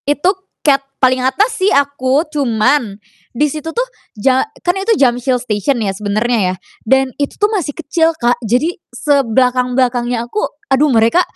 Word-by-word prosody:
Itu, 295 +6 +2 0.3
Category 275 -2 +3 0.2
paling 255 -1 +3
atas 405 - +1
sih 380 +1 +2
aku. 280 +1 +1
Cuman, 240 -5 0 0.4
di 295 +5 +1
situ 310 +2 -5
tuh - - -1 0.3
ja 255 +4 +1 0.2
kan 355 +1 0
itu 400 +4 +1
Jamsil 250 -1 +2
Station 235 +2 -1
ya, 200 -3 0
sebenernya 210 0 0
ya, - - -7 0.3
dan 265 +3 +3
itu 285 -1 -2
tuh 415 - +4
masih 340 -8 -2
kecil, 330 +1 +1
Kak. 240 -2 +1
Jadi, 250 +11 0 0.2
sebelakang-belakangnya 250 -2 +1
aku, 420 - -3 0.3
aduh 275 +3 +3
mereka 230 +9 +4
260 Hz, 155 wpm, -15 LUFS, 240-300 Hz, 0.4 s, tuh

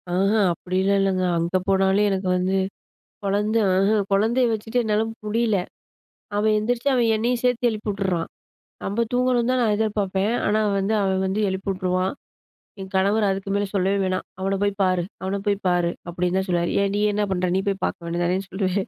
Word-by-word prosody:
ஆஹ 190 +3 +2 0.2
அப்பிடிலாம் 185 +3 0
இல்லங்க. 190 -1 +1
அங்க 170 +2 0
போனாலே 195 +1 +3
எனக்கு 190 -1 -1
வந்து 185 +1 0 0.7
குழந்த 205 +3 +1 0.2
ஆஹ 195 +3 +3
குழந்தைய 225 +6 +3
வச்சுட்டு 225 +2 -1
என்னால 215 0 +1 0.2
முடியல. 220 0 +1 0.8
அவன் 215 +1 +2
எந்திரிச்சி 235 +4 -1
அவன் 240 -2 +3
என்னையும் 235 +2 0
சேர்த்து 245 -1 +2
எழுப்பி 215 -1 -4
உட்டுறான். 190 -4 -2 0.5
நம்ம 210 +4 0
தூங்கணுன்தான் 250 0 +2
நான் 220 -3 +2
எதிர்பார்ப்பேன். 205 -1 0
ஆனா 215 +1 +2 0.2
வந்து 195 +3 0
அவன் 190 -1 +1
வந்து 190 +2 -1
எழுப்பி 190 +1 -4
உட்டுருவான். 185 0 -1 0.7
என் 190 0 -8
கணவர் 200 +3 +2
அதுக்கு 195 0 -3
மேலே 205 0 0
சொல்லவே 195 +1 +2
வேணாம். 185 0 -1
அவன 195 +1 0
போய் 205 0 +1
பாரு! 185 -2 +2 0.2
அவன 190 +1 -2
போய் 205 -1 +2
பாரு! 175 -1 +2 0.2
அப்பிடின்னு 180 +1 -1
தான் 190 +1 -1
சொல்லுவாரு! 175 -1 +1
ஏன் 200 0 +1
நீ - - 0
என்ன 210 +1 0
பண்ற? 185 -1 0
நீ - - +2
போய் 195 -1 -1
பாக்க - - -2
வேண்டியது 170 +1 -1
தானேன்னு 185 +2 -1
சொல்லுவேன். 190 0 -1
195 Hz, 175 wpm, -23 LUFS, 190-215 Hz, 0.8 s, போனாலே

